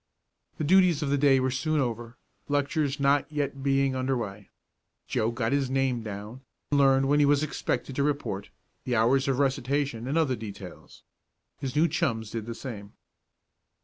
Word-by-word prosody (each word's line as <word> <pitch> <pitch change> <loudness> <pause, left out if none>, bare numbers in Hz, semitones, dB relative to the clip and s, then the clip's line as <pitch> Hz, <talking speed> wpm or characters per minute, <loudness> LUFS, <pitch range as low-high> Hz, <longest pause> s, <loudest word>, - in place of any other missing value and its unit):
The - - -2
duties 175 -1 +4
of 140 - -1
the 145 - +3
day 135 -2 +5
were 130 0 0
soon 150 +4 0
over, 120 -2 -3 0.3
lectures 145 0 0
not 140 +2 +2
yet 140 -2 -2
being 135 -1 +1
under 130 0 0
way. 100 -3 -6 0.6
Joe 110 - 0
got 115 -1 -2
his 140 -2 +1
name 130 -2 0
down, 105 +3 -7 0.3
learned 135 -1 +4
when 145 +1 +3
he 145 - +5
was 145 +1 +3
expected 140 -2 -3
to - - +2
report, 140 -9 -2 0.3
the 125 - -1
hours 130 +5 +3
of 135 -2 +1
recitation, 135 -2 0
and 145 +4 0
other 145 -6 +2
details. 95 - -10 0.6
His 135 0 -4
new 160 +3 +4
chums 115 -8 -1
did 115 -1 -5
the 115 - -5
same. 105 -6 -8
135 Hz, 170 wpm, -27 LUFS, 115-145 Hz, 0.6 s, day